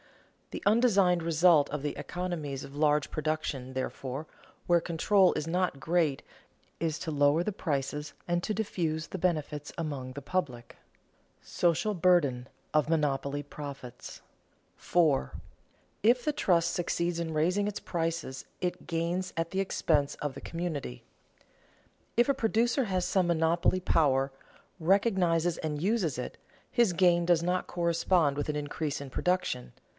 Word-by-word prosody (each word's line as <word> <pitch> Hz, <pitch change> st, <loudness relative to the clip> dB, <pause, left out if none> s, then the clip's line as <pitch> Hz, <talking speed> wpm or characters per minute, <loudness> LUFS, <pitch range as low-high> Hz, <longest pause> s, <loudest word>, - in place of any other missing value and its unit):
The -, -, -7 dB
undesigned 200 Hz, -6 st, +4 dB
result 165 Hz, -2 st, +4 dB
of 150 Hz, -1 st, -3 dB
the 145 Hz, 0 st, -3 dB
economies 150 Hz, -3 st, -4 dB
of 140 Hz, +1 st, -12 dB
large 150 Hz, 0 st, +2 dB
production, 155 Hz, -4 st, -3 dB
therefore, 130 Hz, +2 st, -4 dB, 0.4 s
where 175 Hz, -1 st, +4 dB
control 180 Hz, +3 st, +3 dB
is 150 Hz, -, -2 dB
not 175 Hz, -4 st, 0 dB
great, 160 Hz, -1 st, +1 dB, 0.6 s
is 160 Hz, -2 st, -1 dB
to 165 Hz, -, -4 dB
lower 145 Hz, +2 st, +3 dB
the 210 Hz, +4 st, -2 dB
prices 150 Hz, -3 st, -3 dB
and 175 Hz, 0 st, 0 dB
to 215 Hz, -, -1 dB
diffuse 165 Hz, -7 st, -2 dB
the 190 Hz, -, -6 dB
benefits 155 Hz, -4 st, -1 dB
among 145 Hz, -6 st, -4 dB
the 140 Hz, +2 st, -7 dB
public. 130 Hz, -8 st, -3 dB, 0.6 s
[Sidenote: -, -, -20 dB, 0.3 s
Social 215 Hz, -1 st, -1 dB
burden 165 Hz, -9 st, +2 dB, 0.3 s
of 155 Hz, 0 st, +2 dB
monopoly 145 Hz, -2 st, 0 dB
profits] 140 Hz, -4 st, -9 dB, 0.5 s
4. 155 Hz, -, +1 dB, 0.7 s
If 240 Hz, +3 st, +4 dB
the 300 Hz, -, +1 dB
trust 170 Hz, -8 st, +2 dB
succeeds 170 Hz, -1 st, -1 dB
in 165 Hz, -1 st, -2 dB
raising 180 Hz, +7 st, +1 dB
its 210 Hz, -, -3 dB
prices 165 Hz, -5 st, -3 dB, 0.2 s
it 180 Hz, -1 st, -3 dB
gains 175 Hz, +2 st, -1 dB
at 165 Hz, 0 st, -1 dB
the 190 Hz, +1 st, 0 dB
expense 150 Hz, -6 st, +1 dB
of 145 Hz, -2 st, -4 dB
the 135 Hz, -, -9 dB
community. 160 Hz, -, -4 dB, 1.1 s
If 240 Hz, -, +5 dB
a 280 Hz, -, +4 dB
producer 240 Hz, +1 st, +1 dB
has 185 Hz, -3 st, 0 dB
some 185 Hz, -3 st, +2 dB
monopoly 170 Hz, +2 st, +2 dB
power, 140 Hz, -7 st, +2 dB, 0.5 s
recognizes 175 Hz, -2 st, +2 dB
and 150 Hz, -2 st, -3 dB
uses 185 Hz, -, +1 dB
it, 125 Hz, -, -5 dB, 0.3 s
his 240 Hz, -5 st, +3 dB
gain 175 Hz, -1 st, +4 dB
does 170 Hz, -1 st, +3 dB
not 180 Hz, +1 st, 0 dB
correspond 170 Hz, -3 st, +1 dB
with 145 Hz, +1 st, -3 dB
an 150 Hz, -, -1 dB
increase 145 Hz, 0 st, -3 dB
in 140 Hz, -2 st, -8 dB
production. 180 Hz, -, -1 dB
165 Hz, 145 wpm, -29 LUFS, 145-180 Hz, 1.1 s, If